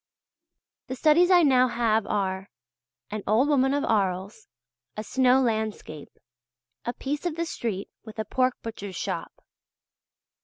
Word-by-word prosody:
The 260 - -4
studies 315 +6 +4
I 355 -2 +6
now 255 -3 +5
have 225 -3 +1
are: 190 -1 -2 0.6
"An 215 0 -3
Old 225 +7 +3
Woman 270 -2 +3
of 285 - 0
Arles," 195 -2 -1 0.5
"A 215 - -3
Snow 255 +2 +3
Landscape," 220 - -3 0.7
"A 240 - -2
Piece 290 +7 -3
of 325 - -3
the 335 +1 -2
Street 220 - -4 0.2
with 220 -1 -12
a 220 - -2
Pork 255 +1 +1
Butcher's 205 -4 -7
Shop." - - -4
235 Hz, 140 wpm, -26 LUFS, 210-265 Hz, 0.7 s, I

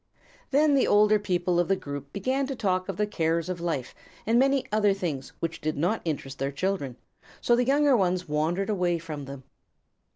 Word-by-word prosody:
Then 290 +2 +4
the 275 - +3
older 210 0 +5
people 180 -3 0
of 175 - +2
the 195 - +3
group 140 -4 -7
began 260 - -1
to 270 - -4
talk 185 -4 -1
of 190 - -4
the 210 - +2
cares 165 -4 -1
of 175 -2 -4
life 160 -8 -3 0.3
and 230 +2 +3
many 270 0 +3
other 210 -2 +3
things 160 -9 -4
which 165 0 -3
did 155 -1 -2
not 175 +9 0
interest 140 -4 -4
their 135 +1 -1
children, 145 -4 -2 0.4
so 240 - +3
the 245 +1 +1
younger 285 0 +4
ones 185 -3 +1
wandered 165 +7 0
away 180 -4 +1
from 155 -3 -7
them. 135 -1 -9
185 Hz, 195 wpm, -27 LUFS, 155-210 Hz, 0.4 s, older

